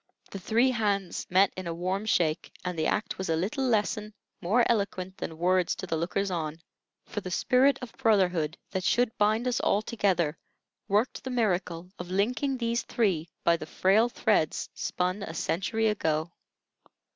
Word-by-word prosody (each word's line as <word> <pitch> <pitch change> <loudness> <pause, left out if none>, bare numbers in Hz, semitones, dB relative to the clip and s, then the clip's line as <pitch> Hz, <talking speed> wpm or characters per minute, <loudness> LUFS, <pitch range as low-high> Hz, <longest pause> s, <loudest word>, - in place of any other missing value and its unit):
The 195 - -6
three 230 +7 +2
hands 200 -6 -1
met 190 +2 +4
in 185 -1 -6
a 165 - -3
warm 185 +5 -2
shake, 160 -6 +1
and 180 -1 -2
the 160 -1 0
act 210 -1 -1
was 190 - -3
a 165 - +2
little 205 - -1
lesson 215 -3 0 0.3
more 215 +7 +3
eloquent 195 -4 -1
than 160 - -5
words 180 +1 +2
to - - -6
the 165 - -2
lookers 185 +4 -1
on; 160 -2 -3 0.5
for 205 - -5
the 185 - -6
spirit 255 +8 +3
of 240 - -7
brotherhood 185 - +2
that 190 -2 -2
should 240 +3 +2
bind 215 +4 +2
us 245 - +1
all 205 - +1
together 180 -9 0 0.5
worked 210 +5 +1
the 260 - -4
miracle 180 -7 -1
of 180 0 -6
linking 245 +8 0
these 235 -1 0
three 180 -8 0
by 170 - +4
the 155 - -8
frail 205 +8 +3
threads 205 -9 0
spun 180 +3 -2
a 165 -4 -6
century 220 +8 0
ago. 160 -6 0
195 Hz, 170 wpm, -28 LUFS, 175-225 Hz, 0.5 s, met